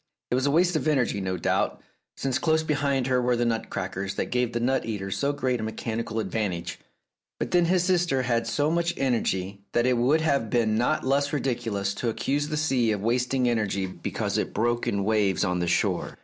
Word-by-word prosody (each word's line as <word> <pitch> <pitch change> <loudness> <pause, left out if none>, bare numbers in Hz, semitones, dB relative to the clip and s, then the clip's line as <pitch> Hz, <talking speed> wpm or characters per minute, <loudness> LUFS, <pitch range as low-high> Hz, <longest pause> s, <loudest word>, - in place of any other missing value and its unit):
It - - +2
was 130 +2 +2
a - - +2
waste 175 +3 +3
of 155 - 0
energy, 125 -9 +1
no 95 -1 -2
doubt, 80 - 0 0.4
since 135 -2 -1
close 160 -1 +2
beside 145 -4 0
her 130 -1 +2
were 125 0 +2
the 120 0 0
nut 115 -1 -1
crackers 95 0 -4
that - - -3
gave 125 -1 +1
the 120 - -2
nut 130 +3 +1
eater 100 -4 -4
so 140 +8 0
great 130 -4 -1
a - - -3
mechanical 110 0 -3
advantage; 90 -7 -3 0.6
but - - -3
then 175 -1 +4
his 180 +1 +2
sister 175 -7 +2
had 115 -2 0
so 145 +6 +1
much 170 0 0
energy 100 -7 -1
that 120 - +2
it 125 -1 +3
would 135 +7 +3
have 140 -8 +1
been 110 -2 +2
not 125 +7 +1
less 140 +2 +1
ridiculous 115 -8 -1
to 120 - -2
accuse 145 +6 -1
the 155 0 -2
sea 130 -7 +2
of 105 -2 -2
wasting 125 +2 +1
energy 105 -5 0
because 90 - -3
it - - -3
broke 120 +1 0
in 100 -1 0
waves 105 -3 +2
on 90 0 0
the 85 - -1
shore. 85 - 0
120 Hz, 210 wpm, -26 LUFS, 110-140 Hz, 0.6 s, then